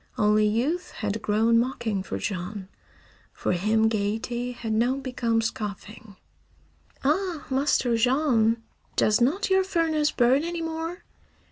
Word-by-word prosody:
Only 210 0 +3
youth 260 +12 -1
had 210 0 -3
grown 225 +2 +3
mocking 235 -5 -1
for - - -5
Jean. 190 0 -5 0.6
For - - -2
him 215 +5 +2
gaiety 225 +3 -2
had 225 -2 -4
now 240 +4 +2
become 245 -4 -1
scoffing. 210 -1 -6 0.9
"Ah, 330 +3 0
Master 265 -3 +2
Jean! 235 -2 +2 0.3
Does 215 +2 +3
not 375 +12 +1
your 380 0 +4
furnace 325 -5 +1
burn 260 +3 +3
any 340 0 -3
more? 325 +2 -4
235 Hz, 125 wpm, -26 LUFS, 215-295 Hz, 0.9 s, your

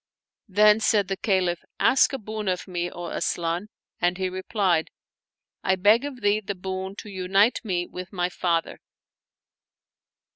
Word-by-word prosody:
Then 210 +2 +5
said 210 -3 +2
the 195 - 0
Caliph, 185 -4 0
" - - -52
Ask 265 - +4
a 270 - -2
boon 215 -2 -6
of 185 0 -1
me, 175 -1 -2
O 175 0 -7
Asian! 170 +4 -2
" - - -45
and 175 0 +2
he 190 -1 -1
replied, 185 -3 0 0.4
" - - -68 0.3
I 190 - +3
beg 210 +7 +4
of 265 -4 -7
thee 205 +1 +3
the 200 -1 -5
boon 190 +1 -5
to 210 - -9
unite 195 +4 +2
me 180 -5 -1
with 180 0 -8
my 180 -3 0
father." 170 -2 -1
190 Hz, 170 wpm, -25 LUFS, 180-210 Hz, 0.4 s, Then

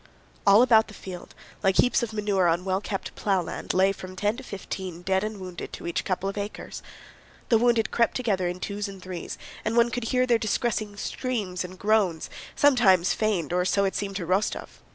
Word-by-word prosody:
All 200 +4 +8
about 225 -3 +5
the 215 - -12
field, 180 -2 -9 0.3
like 195 -1 +2
heaps 250 - +4
of 235 -2 -2
manure 205 -4 +1
on 170 +2 +1
well 190 0 0
kept 200 -2 -4
plowland, 190 -4 -1
lay 190 +1 +4
from 185 -1 -8
ten 205 +3 0
to - - -7
fifteen 190 -6 -6
dead 190 +1 +1
and 215 -1 -4
wounded 185 -2 -7
to - - -7
each 170 - -1
couple 190 0 -1
of 200 +1 -3
acres. 205 +1 -6 0.7
The 225 - +5
wounded 235 -2 +2
crept 235 -1 +2
together 200 -8 0
in 180 +1 -4
twos 205 +2 -3
and 195 -1 -9
threes 185 -2 -6 0.3
and 225 +2 -1
one 235 0 +5
could 245 -1 -3
hear 255 +2 +2
their 240 -2 +3
distressing 215 -1 -1
screams 205 -6 -3
and 180 +1 -9
groans, 200 -5 +1 0.2
sometimes 205 -11 +5
feigned—or 180 -4 0
so 200 +1 +2
it 195 - 0
seemed 195 -1 -3
to 185 -3 -3
Rostóv. 190 +5 0
200 Hz, 195 wpm, -26 LUFS, 185-220 Hz, 0.7 s, All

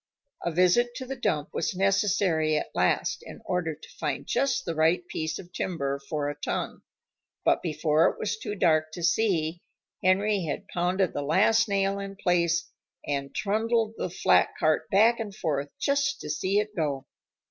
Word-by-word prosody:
A - - 0
visit 185 +8 +3
to 260 - -5
the 270 +1 -5
dump 155 - -1
was 170 - -1
necessary 190 -5 +2
at - - -3
last, - - +1
in - - -11
order 170 -4 -1
to 155 - -15
find - - -2
just 270 -1 0
the 170 - -2
right 165 +3 +2
piece 160 0 -3
of 175 -1 -12
timber 140 -6 -2
for 145 +1 -3
a 145 - -2
tongue, - - -3 0.6
but - - +3
before 155 -1 +2
it - - -7
was 210 0 -2
too 210 -1 -5
dark 155 -4 +2
to 175 - -6
see, 170 -3 +1 0.4
Henry 195 +2 +2
had 150 - -4
pounded 180 +1 0
the 145 - -2
last 210 +9 +3
nail 195 0 +1
in 195 0 -6
place 175 -2 +1 0.4
and 140 -1 -3
trundled 220 +2 +1
the 185 - -3
flat 175 - +3
cart 155 0 +1
back 225 +5 +4
and 210 -3 -5
forth 145 -5 -2
just 280 -1 +1
to 150 - -4
see 185 +6 0
it 210 0 -1
go. 140 -5 -1
180 Hz, 175 wpm, -27 LUFS, 155-210 Hz, 0.6 s, back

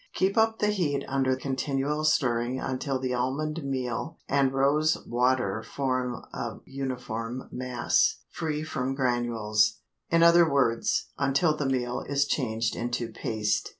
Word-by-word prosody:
Keep 190 +1 +1
up 225 0 +3
the 210 - +1
heat 160 -9 0
under 130 -1 +1
continual 140 +2 -1
stirring 125 -4 +1
until 130 +1 -2
the 130 -1 -2
almond 145 +6 -1
meal 135 +3 -3
and 140 -1 +2
rose 145 +4 +3
water 120 -4 +1
form 130 0 -2 0.2
a - - -4
uniform 125 -3 -4
mass 125 -1 +1
free 155 -3 -2
from 135 -4 -2
granules; 120 -5 +1 0.3
in 165 0 +4
other 170 -1 +6
words, 120 -5 +1
until 140 +3 +2
the 145 -3 -1
meal 125 -2 -1
is 140 0 +2
changed 115 -6 -1
into 120 0 -2
paste. 105 -1 -1
130 Hz, 135 wpm, -27 LUFS, 120-145 Hz, 0.3 s, other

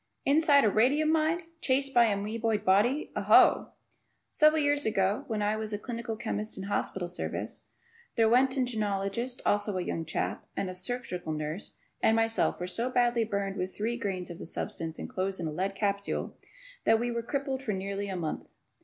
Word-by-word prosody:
Inside 285 0 +5
of 215 - +4
a - - -8
radium 285 +8 +3
mine! 320 +2 +1 0.2
Chased 275 0 +1
by 240 -1 +6
an 210 -3 +1
amoeboid 220 -1 -1
body! 215 +10 +3
Ooh! - - +5 0.6
Several 305 +1 +5
years 290 -1 +2
ago 200 -1 +1
when 215 -2 -1
I 210 +1 +1
was 215 0 -4
a - - 0
clinical 230 0 -5
chemist 215 -1 -3
in 190 - -5
hospital 190 -2 -2
service, 175 - -4 0.5
the 230 - +3
Roentgenologist, 235 -2 +1
also 205 -1 +1
a 180 - -1
young 165 - -3
chap, 155 - -2
and 185 - -1
a - - -7
surgical 185 -4 -3
nurse 155 +5 -5 0.3
and 220 - +4
myself 225 0 +1
were 180 - -2
so 230 +7 -1
badly 240 -2 +2
burned 200 -2 -2
with 185 0 -4
three 225 +3 -1
grains 190 -6 -3
of 170 - -9
the - - -7
substance 165 -1 -4
enclosed 190 +1 -3
in 170 - -3
a 155 - -2
lead 190 +5 -2
capsule 200 -1 -2 0.5
that 225 - +4
we 240 +1 -1
were 235 0 -2
crippled 270 +2 -3
for 220 -6 -2
nearly 195 +1 -3
a 190 - -3
month. 165 -4 -4
215 Hz, 185 wpm, -29 LUFS, 195-245 Hz, 0.6 s, by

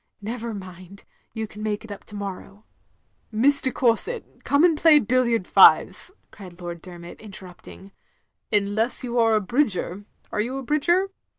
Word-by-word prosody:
Never 230 +1 -5
mind, 185 0 -11 0.3
you 220 -1 -4
can 210 0 -12
make 215 0 -3
up - - -14
for - - -5
it - - -29
to 210 - -9
morrow. 200 +1 -8 0.3
" - - -44
"Miss 280 +2 +4
de 260 - -1
Courset, 250 - -1
come 285 +2 +2
and 345 -2 +5
play 310 0 +6
billiard 235 -4 +1
fives," - - +5 0.2
cried 180 -3 -13
Lord 175 -1 -7
Dermot, 175 -2 -11
interrupting, 195 -1 -13 0.6
"tmless 210 +4 +1
you 245 -1 -1
are 225 -1 +4
a 215 - +2
bridger. 205 -4 -1 0.3
Are 210 - -1
you 250 +5 -3
a 270 - -5
bridgdr?" 345 +8 +1
215 Hz, 170 wpm, -23 LUFS, 195-255 Hz, 0.6 s, play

